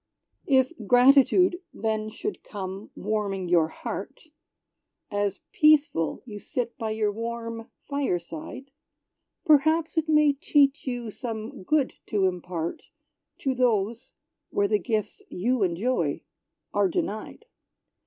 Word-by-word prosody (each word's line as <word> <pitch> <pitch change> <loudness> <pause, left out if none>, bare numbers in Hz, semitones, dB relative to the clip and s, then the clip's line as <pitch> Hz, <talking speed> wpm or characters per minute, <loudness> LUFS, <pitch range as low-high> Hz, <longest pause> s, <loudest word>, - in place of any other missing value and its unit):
If 265 +2 +3
gratitude 275 - +5
then 215 0 -2
should 400 - -5
come, 195 0 -6
warming 200 -3 -2
your 170 -3 +4
heart, 315 - -7 0.8
As 205 -1 -1
peaceful 295 - +3
you 210 -4 -8
sit 240 +2 -3
by 225 -5 -3
your 215 -1 0
warm 230 +1 -5 0.2
fireside; 260 - -3 0.7
Perhaps 315 +2 +4
it 315 0 -4
may 300 -2 +5
teach 280 0 +2
you 240 -3 -3
some 225 +2 -6
good 280 +7 +1
to 205 -3 +1
impart 175 -2 -3 0.6
To 270 - +1
those, 235 -1 0 0.4
where 200 - +1
the 210 0 +2
gifts 220 -3 -2
you 240 +6 0
enjoy 180 - 0 0.5
are 205 -1 +3
denied. 215 - -4
230 Hz, 115 wpm, -26 LUFS, 200-275 Hz, 0.8 s, gratitude